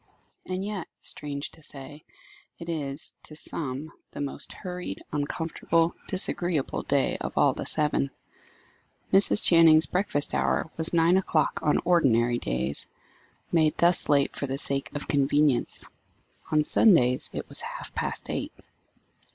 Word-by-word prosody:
And 185 +1 -3
yet, 205 -4 -4
strange 140 -1 -3
to 160 - -15
say, 145 +1 -10 0.5
it 170 0 -8
is, 145 -3 -5
to 155 - -11
some, 150 -1 -5 0.2
the - - -10
most 140 -1 -5
hurried, 180 - -6
uncomfortable, 165 +3 0
disagreeable 175 -5 +1
day 140 -1 +1
of - - -5
all - - +4
the - - -4
seven. 150 -2 +1 1.0
Mrs. 200 +2 +4
Channing's 165 -2 +6
breakfast 180 -6 -1
hour - - +1
was 160 0 -1
nine 170 +2 +4
o'clock 165 -4 +1
on 150 - +2
ordinary 120 -9 +3
days, 65 +3 -3 0.6
made 155 -2 +2
thus 175 +1 +2
late 140 -1 +3
for 140 - -3
the 135 +1 -3
sake 140 -1 +1
of 145 - -4
convenience. 145 -1 +1 0.7
On 155 -1 +3
Sundays 130 - +4
it - - -6
was - - 0
half - - -7
past - - -3
eight. - - -3
150 Hz, 135 wpm, -27 LUFS, 140-170 Hz, 1.0 s, Channing's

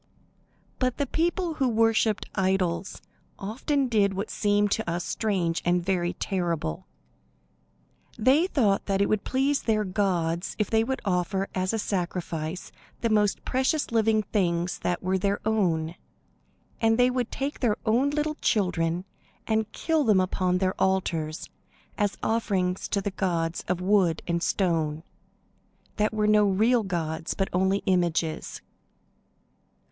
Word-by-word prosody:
But 255 -1 0
the 285 - 0
people 340 +4 0
who 275 -4 0
worshipped 225 -1 +2
idols 190 -2 -1 0.3
often 260 +7 -1
did 205 -4 +2
what 200 +3 -3
seems 205 -1 +1
to 220 -5 -4
us 175 +1 -2
strange 185 -6 -1
and 175 0 +1
very 175 -2 0
terrible. 170 - -2 1.3
They 270 +10 +4
thought 215 - +1
that 195 -1 +1
it 200 - +4
would 215 -1 0
please 275 +2 +1
their 215 -2 +1
gods 180 -3 -1
if 210 - -1
they 220 0 +3
would 265 +3 -3
offer 190 +1 0
as 185 0 0
a 225 - -1
sacrifice 175 -4 -3 0.3
the 230 - +1
most 210 -2 +1
precious 265 +3 0
living 220 -1 +2
things 175 -4 -1
that 175 +1 -2
were 190 +1 +1
their 200 +2 0
own; 170 -7 +1 0.9
and 225 0 +3
they 250 0 +4
would 250 -2 -1
take 275 +2 -4
their 225 -5 +1
own 240 +6 +3
little 300 +1 -1
children 180 -3 0 0.4
and 220 -1 0
kill 320 +4 0
them 210 -6 +4
upon 185 0 +1
their 185 0 +1
altars 170 -5 0 0.5
as 205 -2 -1
offerings 190 -5 0
to 200 - -1
the 200 - -3
gods 170 -4 -1
of 180 0 -1
wood 185 -4 +2
and 170 -1 -1
stone, 160 -5 0 0.9
that 210 0 +2
were 215 -1 0
no 210 0 +5
real 225 +5 +3
gods, 165 -5 -3
but 195 - -1
only 190 +2 +1
images. 170 -4 0
195 Hz, 140 wpm, -26 LUFS, 180-225 Hz, 1.3 s, no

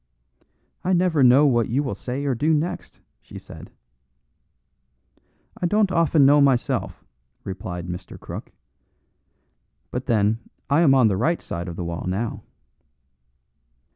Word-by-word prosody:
"I 185 - +1
never 175 -4 +2
know 130 +3 +6
what 120 -5 +2
you 135 +5 0
will 130 - -3
say 130 +3 -5
or 140 - +1
do 155 +7 +1
next," 160 +4 -4 0.2
she - - -12
said. - - -12 1.9
"I 175 - +2
don't 205 +1 +2
often 165 -4 +3
know 145 +1 +6
myself," 130 -4 0 0.4
replied 90 -2 -6
Mr. 90 0 -8
Crook; - - -8 1.4
"but 125 +1 -5
then 110 -2 +2 0.3
I 145 +4 +4
am 140 -5 +5
on 130 -4 +5
the 100 -3 0
right 165 - +1
side 85 +1 -6
of 85 - -6
the 90 - -5
wall 85 0 -5
now." 105 +5 -3
130 Hz, 140 wpm, -23 LUFS, 105-155 Hz, 1.9 s, know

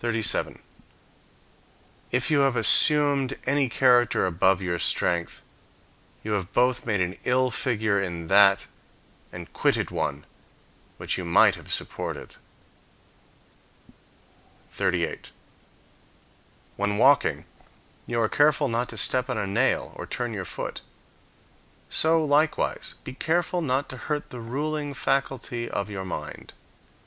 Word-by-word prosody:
If 125 +4 -1
you 150 - +4
have 135 -2 +2
assumed 140 +2 +4
any 140 -1 +1
character 120 -3 +3
above 95 +1 +2
your 90 -2 -3
strength, 85 -1 0 0.8
you 110 - -4
have 100 -2 -2
both 125 0 +1
made 105 -4 +1
an 90 +1 -3
ill 130 0 +1
figure 110 -4 0
in 85 -3 -4
that 100 +2 +5 0.7
and 85 -1 -10
quitted - - 0
one 70 +1 -3 0.7
which - - -2
you - - -4
might 85 -1 +5
have - - -10
supported. - - -4 2.4
38. 90 -3 -2 1.5
When 100 0 -1
walking, 135 +5 +3 0.6
you 120 -1 -1
are 110 - +2
careful 145 +3 +3
not 120 +2 -1
to 110 - -8
step 125 +5 0
on 125 - -2
a 100 - -1
nail 110 +7 0
or - - -8
turn 120 -2 -3
your 95 -3 -5
foot; - - -6 1.1
so 160 0 +2
likewise 150 +2 0
be - - -7
careful 175 +5 -1
not 135 -2 -1
to 130 - -7
hurt 150 +3 -4
the 125 - -7
ruling 145 +4 -3
faculty 130 -3 -2
of 100 +1 -3
your 95 -2 -5
mind. 95 - -7
120 Hz, 120 wpm, -25 LUFS, 100-140 Hz, 2.4 s, that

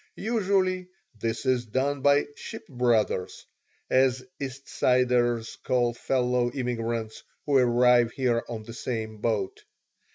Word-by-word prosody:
Usually 190 -4 0 0.3
this 115 0 -2
is 125 -2 +1
done 135 +5 -1
by 145 +1 +4
"ship - - -8
brothers," 120 -7 0 0.4
as 130 -1 +2
East 135 -1 -6
Siders 125 -2 +1
call 120 -2 +1
fellow 125 0 0
immigrants 115 -3 -3 0.2
who 140 -2 +4
arrive 120 -1 +4
here 120 -4 +1
on 115 -2 -5
the 115 +1 -9
same 110 -2 -4
boat. 105 -3 -2
125 Hz, 120 wpm, -27 LUFS, 115-130 Hz, 0.4 s, by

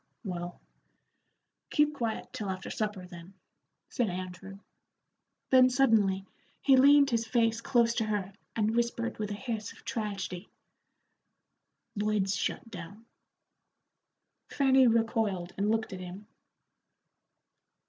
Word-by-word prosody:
"Well, 175 -3 -5 1.1
keep 300 0 +2
quiet 230 -6 -4
till 205 -2 -4
after 190 0 -5
supper, 210 -4 -3
then," 175 +1 -12 0.5
said 245 -6 -1
Andrew. 185 +1 -7 0.9
Then 255 -1 +7
suddenly 220 -7 +3 0.3
he 270 - +5
leaned 280 +1 +6
his 230 -1 0
face 230 -2 +1
close 235 -1 +3
to 225 - +1
her 205 -2 -2 0.2
and 220 0 +1
whispered 235 -1 -1
with 210 -1 -2
a 205 - -3
hiss 220 -1 -4
of - - -19
tragedy, 195 -4 -4 1.5
"Lloyd's 205 -2 0
shut 230 - -3
down." 200 +5 -9 1.4
Fanny 265 -2 +4
recoiled 225 -6 0
and 200 +2 0
looked 220 -1 0
at 185 - -6
him. 185 +3 -8
215 Hz, 115 wpm, -30 LUFS, 190-235 Hz, 1.5 s, Then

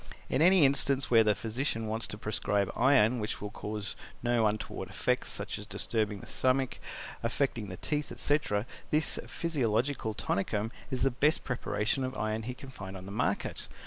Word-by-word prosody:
In 135 - +1
any 180 -2 +7
instance 135 -1 +3
where 115 -2 +7
the 105 -1 +3
physician 115 +2 -2
wants 110 +1 -2
to 105 - -7
prescribe 105 -2 0
iron 125 -2 +4
which 105 - -3
will 105 0 -5
cause 105 0 -5 0.3
no 120 -2 +3
untoward 105 +1 -3
effects, - - 0
such - - -3
as - - -8
disturbing 105 -3 -1
the - - -10
stomach, 130 0 +1 0.4
affecting 115 -2 0
the 95 - -6
teeth, 150 - -2
etc., 130 -8 +1 0.2
this 155 +1 +2
PHYSIOLOGICAL 125 -6 0
TONICUM 105 +2 -1 0.2
is 130 -2 -1
the 135 - +4
best 150 +6 +2
preparation 125 0 -1
of 130 0 -3
iron 110 +1 -1
he 125 +3 -5
can 135 - -10
find 95 -6 -7
in 95 - -9
the 100 - -7
market. 100 - -1
115 Hz, 175 wpm, -31 LUFS, 105-135 Hz, 0.4 s, any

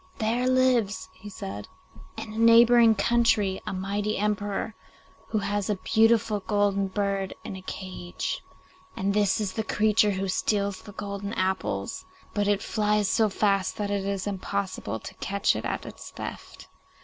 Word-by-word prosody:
'There 235 +3 0
lives,' 255 -6 +2
he 205 - -11
said, 100 - -7 0.5
'in 215 - -6
a - - -7
neighbouring 230 0 +7
country, 215 -3 +2
a - - -1
mighty 200 +3 -2
emperor 205 +1 -1 0.5
who 220 - -1
has 205 -1 -1
a 210 - +2
beautiful 220 +1 +3
golden 200 -1 +1
bird 195 -1 -2
in - - -6
a 190 - -8
cage, 185 -1 -5 0.6
and 195 +1 0
this 205 -1 +2
is 205 -3 -2
the 220 - -2
creature 210 0 +3
who 195 -1 -1
steals 200 +1 0
the 210 - -11
golden 200 0 -5
apples, 185 - -2 0.3
but 205 -1 0
it 205 -1 +1
flies 210 -1 +1
so 220 +2 +3
fast 195 -1 +1
that 205 -1 -2
it 200 -1 0
is 195 -1 -2
impossible 195 - -3
to - - -9
catch 200 0 +1
it - - -4
at - - -3
its - - -9
theft. - - -8
205 Hz, 160 wpm, -27 LUFS, 195-215 Hz, 0.6 s, neighbouring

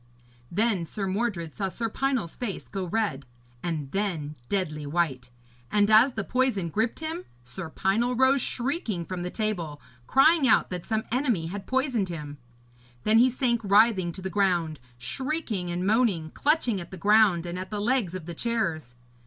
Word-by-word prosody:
Then 205 -1 +1
Sir 200 +4 -4
Mordred 190 -5 -2
saw 195 - -2
Sir 230 +5 -3
Pinel's 250 -6 -1
face 230 -6 -5
go 195 -2 -4
red, 180 - -1 0.3
and 155 -5 -3
then 175 -8 -2 0.2
deadly 155 -7 -2
white. 140 -6 -1 0.4
And 205 0 +3
as 230 +5 +6
the 220 - -2
poison 245 -7 0
gripped 225 - -1
him, 325 +3 -4 0.2
Sir 160 +8 -7
Pinel 225 +9 +1
rose 260 +2 +4
shrieking 240 - -1
from 180 +2 -5
the 180 - -3
table, 180 -9 -3 0.3
crying 290 +1 +5
out 220 - +4
that 180 -2 -5
some 220 -1 0
enemy 245 - +1
had 195 +4 -6
poisoned 260 -7 0
him. 150 -4 -7 0.6
Then 220 +1 +5
he 250 +2 +6
sank 240 -2 0
writhing 200 -3 +4
to 190 - -9
the 190 - -3
ground, 175 -5 +1 0.2
shrieking 230 - -3
and 175 +1 -2
moaning, 200 -8 +2
clutching 280 - +1
at 170 - -9
the 190 - -9
ground 200 -2 +4
and 175 +1 -4
at 185 - -6
the 210 - -3
legs 215 -5 +1
of 185 -4 -6
the 170 - -6
chairs. 165 - -2
200 Hz, 170 wpm, -27 LUFS, 170-235 Hz, 0.6 s, as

